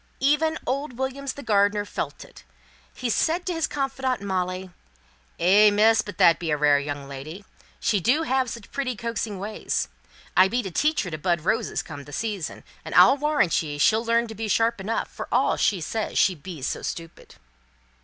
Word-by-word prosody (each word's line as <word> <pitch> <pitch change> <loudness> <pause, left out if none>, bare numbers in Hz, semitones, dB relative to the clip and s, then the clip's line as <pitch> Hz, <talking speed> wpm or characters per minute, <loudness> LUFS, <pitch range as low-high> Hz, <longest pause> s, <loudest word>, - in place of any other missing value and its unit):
Even 305 +3 +2
old 275 +2 -2
Williams, 265 +1 -3
the 280 - -9
gardener, 205 -1 +2
felt - - -5
it; - - -16 0.5
he 255 - -4
said 330 +9 +1
to 360 - -1
his 325 -1 0
confidante, 265 -3 -2
Molly 185 -1 -2 0.7
"Eh, 200 +5 +6
miss, 215 +2 +4
but 205 -4 -9
that 165 - +5
be 170 - -3
a 150 - +1
rare 145 -1 +4
young 145 -1 -5
lady! 155 +8 -8 0.3
She 205 - +1
do 255 - +2
have 260 -2 0
such 230 -2 -9
pretty 265 -3 -2
coaxing 230 -2 -3
ways. 205 +3 -3 0.5
I 185 +1 +7
be 240 +5 -1
to 190 - -5
teach 300 - +1
her 180 - -6
to 155 - -5
bud 170 0 0
roses 220 +6 -1
come 145 -3 -9
the 145 - -12
season 210 -5 -4 0.2
and - - -6
I'll 270 - +8
warrant 295 - +2
ye 150 -2 -5
she'll 220 +10 +3
learn 235 0 +1 0.2
sharp 225 +1 +1
enough, 220 +4 -2
for - - -8
all - - +3
she 195 - +1
says 215 +7 -3
she 190 - +4
bees 160 -3 -7
so - - -3
stupid." 165 -1 -7
210 Hz, 185 wpm, -25 LUFS, 175-255 Hz, 0.7 s, I'll